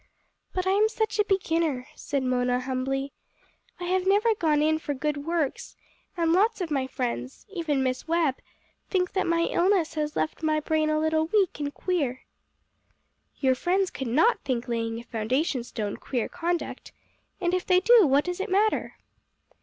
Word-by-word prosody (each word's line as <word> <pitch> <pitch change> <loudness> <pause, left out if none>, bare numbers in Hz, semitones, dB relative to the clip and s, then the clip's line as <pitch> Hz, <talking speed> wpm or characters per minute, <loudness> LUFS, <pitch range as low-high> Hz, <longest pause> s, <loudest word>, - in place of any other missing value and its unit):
"But 370 0 -2
I 375 - +2
am 420 +3 +4
such 440 -1 -2
a - - +6
beginner," 330 -9 0
said 280 -2 -3
Mona 250 -1 +1
humbly. 270 +2 -2 0.7
"I - - -6
have 370 +1 0
never 420 +4 +4
gone 320 -7 +1
in 315 0 +2
for 295 -3 -3
good 290 +1 -3
works, 330 -5 -2 0.4
and 335 -1 +2
lots 425 +5 +3
of 350 -4 -3
my 270 -3 0
friends 235 - -4
even 305 -7 0
Miss 255 +3 -2
Webb 325 -5 +1 0.5
think 365 -2 0
that 380 - 0
my 335 0 +2
illness 345 0 +2
has 300 -1 -2
left 155 - -2
my 310 -1 +1
brain 310 0 0
a 310 - +2
little 315 0 +1
weak 390 -4 +1
and 290 -1 -2
queer." 285 -8 -2 1.1
"Your 260 -2 +3
friends 365 +8 0
could 265 - -5
not 320 - +3
think 255 -3 -2
laying 230 -1 -2
a 235 - -7
foundation 245 +4 -1
stone 215 -4 -4
queer 245 -4 -2
conduct. 350 -1 -3 0.5
And 350 0 0
if 365 0 +1
they 365 -2 +4
do, 440 -1 +6
what 280 +2 +4
does 360 0 -3
it 395 +3 -3
matter?" 415 +3 +1
315 Hz, 175 wpm, -26 LUFS, 265-365 Hz, 1.1 s, a